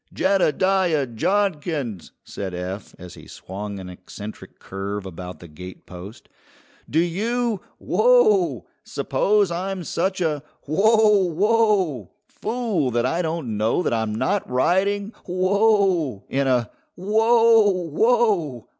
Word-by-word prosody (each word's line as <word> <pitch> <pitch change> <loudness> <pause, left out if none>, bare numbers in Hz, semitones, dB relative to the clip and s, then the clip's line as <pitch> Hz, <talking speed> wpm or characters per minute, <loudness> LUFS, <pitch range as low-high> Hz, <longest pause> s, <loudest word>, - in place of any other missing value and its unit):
"Jeddediah 185 -7 +1
Jodkins!" 150 - -1
said 95 -3 -6
Eph, 95 +3 -6
as 90 -1 -11
he - - -14
swung 100 +2 -7
an 95 - -8
eccentric 90 +4 -10
curve 100 +1 -6
about 90 0 -8
the 85 - -10
gatepost; 90 +4 -11 0.6
"do 155 - -1
you 215 +6 0 0.2
whoa! 435 -8 +3 0.2
suppose 205 -3 +1
I'm 185 +1 -3
such 190 +4 -2
a 155 -5 -1 0.2
whoa! 210 +4 +3
whoa! 195 - +1 0.2
fool 220 - -2
that 120 0 0
I 165 +7 0
don't 160 -10 -3
know 110 +11 +1
that - - 0
I'm 110 -2 -1
not 200 - -1
riding 195 - +1 0.2
whoa! 185 - +1
in 135 0 0
a 125 -4 +1 0.2
whoa! 225 +2 +4 0.2
whoa! 190 - +1
170 Hz, 115 wpm, -22 LUFS, -, 0.6 s, whoa